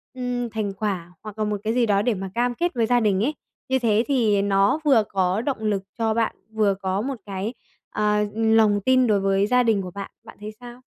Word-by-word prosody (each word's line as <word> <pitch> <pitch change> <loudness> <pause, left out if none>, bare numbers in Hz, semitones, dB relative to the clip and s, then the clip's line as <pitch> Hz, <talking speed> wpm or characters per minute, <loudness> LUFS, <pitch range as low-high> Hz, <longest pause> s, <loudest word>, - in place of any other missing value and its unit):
ừm, 245 -1 -3
thành 210 -2 -3
quả 190 -4 -3
hoặc 215 0 -9
là 215 - 0
một 210 0 -1
cái 220 +1 0
gì 245 -1 +2
đó 200 -2 +2
để 240 +2 +1
mà 195 -1 -5
cam 245 +1 +1
kết 345 +6 -1
với 230 -2 +1
gia 245 +1 +3
đình 205 -2 +1
ấy. 295 - 0 0.4
Như 265 0 +2
thế 225 -1 +2
thì 225 -8 +2
nó 200 +7 +2
vừa 250 -7 +5
có 190 +2 0
động 270 -1 -2
lực 205 -3 -1
cho 225 -1 +1
bạn, 230 0 0 0.2
vừa 215 -2 +2
có 190 0 -2
một 270 +4 -3
cái, 200 +4 -4 0.4
ờ, 210 0 +1
lòng 220 -2 +3
tin 255 -1 +4
đối 210 -2 +3
với 195 +1 +1
gia 250 +1 +3
đình 220 -4 +2
của 180 -1 -7
bạn. 200 +1 -7
Bạn - - -14
thấy 215 - -6
sao? 245 0 -11
215 Hz, 235 wpm, -23 LUFS, 200-240 Hz, 0.4 s, vừa